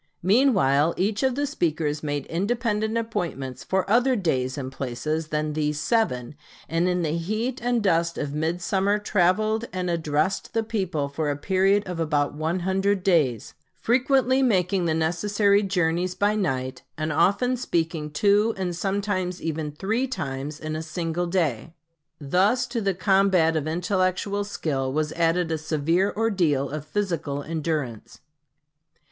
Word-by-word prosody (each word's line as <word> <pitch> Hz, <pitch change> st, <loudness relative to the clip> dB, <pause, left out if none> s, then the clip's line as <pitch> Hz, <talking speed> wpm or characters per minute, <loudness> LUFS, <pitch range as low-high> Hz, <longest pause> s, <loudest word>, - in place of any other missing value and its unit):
Meanwhile 180 Hz, -, +3 dB
each 200 Hz, +3 st, 0 dB
of 260 Hz, -2 st, +1 dB
the 290 Hz, +1 st, 0 dB
speakers 155 Hz, -, -1 dB
made 145 Hz, -2 st, -3 dB
independent 220 Hz, +4 st, -1 dB
appointments 170 Hz, -, -3 dB
for 190 Hz, 0 st, 0 dB
other 245 Hz, +5 st, +3 dB
days 130 Hz, -, -1 dB
and 130 Hz, -2 st, -4 dB
places 150 Hz, +5 st, -3 dB
than 150 Hz, 0 st, -2 dB
these 150 Hz, -1 st, -1 dB
seven; 150 Hz, -, 0 dB, 0.3 s
and 165 Hz, +2 st, +1 dB
in 180 Hz, -1 st, 0 dB
the 155 Hz, 0 st, 0 dB
heat 215 Hz, +9 st, -2 dB
and 240 Hz, -2 st, 0 dB
dust 170 Hz, -3 st, +1 dB
of 145 Hz, -1 st, -3 dB
midsummer 180 Hz, +6 st, 0 dB
traveled 210 Hz, +3 st, +1 dB
and 180 Hz, -1 st, -2 dB
addressed 160 Hz, +4 st, -1 dB
the 225 Hz, -, +2 dB
people 190 Hz, -10 st, -2 dB
for 145 Hz, +2 st, -2 dB
a 145 Hz, -, -1 dB
period 195 Hz, +5 st, +2 dB
of 180 Hz, -2 st, -4 dB
about 150 Hz, -3 st, 0 dB
one 160 Hz, +4 st, -2 dB
hundred 190 Hz, +1 st, 0 dB
days, 150 Hz, -, +1 dB, 0.2 s
frequently 260 Hz, +2 st, +2 dB
making 190 Hz, -6 st, +2 dB
the 160 Hz, -1 st, +1 dB
necessary 200 Hz, +5 st, +2 dB
journeys 180 Hz, -2 st, 0 dB
by 205 Hz, +1 st, +2 dB
night, 130 Hz, -10 st, -2 dB, 0.2 s
and 155 Hz, 0 st, -2 dB
often 200 Hz, -, +2 dB
speaking 165 Hz, -9 st, -2 dB
two 205 Hz, +7 st, +2 dB
and 180 Hz, -2 st, -2 dB
sometimes 190 Hz, -1 st, -2 dB
even 155 Hz, -2 st, -3 dB
three 220 Hz, -, -1 dB
times 145 Hz, -, -4 dB
in 155 Hz, 0 st, -4 dB
a 155 Hz, -, -3 dB
single 165 Hz, +2 st, -3 dB
day. 165 Hz, -4 st, -1 dB, 0.4 s
Thus 190 Hz, -, +2 dB
to 240 Hz, -2 st, -3 dB
the 195 Hz, -2 st, 0 dB
combat 190 Hz, -4 st, +3 dB
of 155 Hz, -1 st, -1 dB
intellectual 185 Hz, +4 st, 0 dB
skill 135 Hz, -9 st, -2 dB
was 150 Hz, +2 st, -1 dB
added 165 Hz, 0 st, +1 dB
a 160 Hz, -, -1 dB
severe 165 Hz, +5 st, +1 dB
ordeal 170 Hz, -12 st, +1 dB
of 150 Hz, 0 st, -5 dB
physical 160 Hz, -7 st, -2 dB
endurance. 155 Hz, -8 st, -4 dB
175 Hz, 150 wpm, -25 LUFS, 155-205 Hz, 0.4 s, Meanwhile